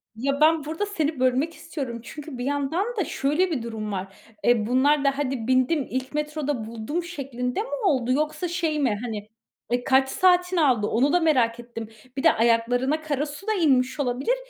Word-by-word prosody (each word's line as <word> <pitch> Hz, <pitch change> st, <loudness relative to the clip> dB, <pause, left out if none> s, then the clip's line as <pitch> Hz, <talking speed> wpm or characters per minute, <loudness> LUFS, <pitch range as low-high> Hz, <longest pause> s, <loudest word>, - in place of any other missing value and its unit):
Ya, 275 Hz, +5 st, -1 dB
ben 315 Hz, -1 st, +4 dB
burada 320 Hz, +7 st, -2 dB
seni 315 Hz, -8 st, -2 dB
bölmek 260 Hz, +6 st, +1 dB
istiyorum 265 Hz, -9 st, -6 dB
çünkü 295 Hz, 0 st, -8 dB
bir 245 Hz, -, -4 dB
yandan 285 Hz, +7 st, 0 dB
da 390 Hz, -, +1 dB
şöyle 305 Hz, +9 st, 0 dB
bir 250 Hz, -7 st, -2 dB
durum 220 Hz, -2 st, -5 dB
var. 195 Hz, 0 st, -5 dB, 0.3 s
Eee, 235 Hz, -3 st, +3 dB
bunlar 280 Hz, +4 st, +3 dB
da 275 Hz, 0 st, +2 dB
"Hadi 260 Hz, -5 st, -2 dB
bindim, 260 Hz, +3 st, +2 dB
ilk 260 Hz, +2 st, -4 dB
metroda 295 Hz, -5 st, -2 dB
buldum," 230 Hz, +10 st, -4 dB
şeklinde 270 Hz, -, -3 dB
mi 470 Hz, -, -6 dB, 0.2 s
oldu? 255 Hz, -7 st, +2 dB
Yoksa 305 Hz, +4 st, 0 dB
şey 330 Hz, -3 st, -1 dB
mi, 240 Hz, -7 st, +1 dB
hani, 215 Hz, -3 st, -5 dB, 0.4 s
eee, 245 Hz, 0 st, +1 dB
kaç 265 Hz, 0 st, +3 dB
saatini 360 Hz, 0 st, +3 dB
aldı, 240 Hz, -8 st, +3 dB
onu 275 Hz, +7 st, +2 dB
da 355 Hz, -, +5 dB
merak 245 Hz, -8 st, +2 dB
ettim. 235 Hz, -2 st, -7 dB, 0.3 s
Bir 270 Hz, -, -2 dB
de 325 Hz, -, +6 dB
ayaklarına 245 Hz, +6 st, +2 dB
kara 295 Hz, -2 st, -1 dB
su 295 Hz, +8 st, -9 dB
da 435 Hz, -, +2 dB
inmiş 270 Hz, -8 st, +2 dB
olabilir. 265 Hz, -, 0 dB
275 Hz, 185 wpm, -25 LUFS, 245-310 Hz, 0.4 s, de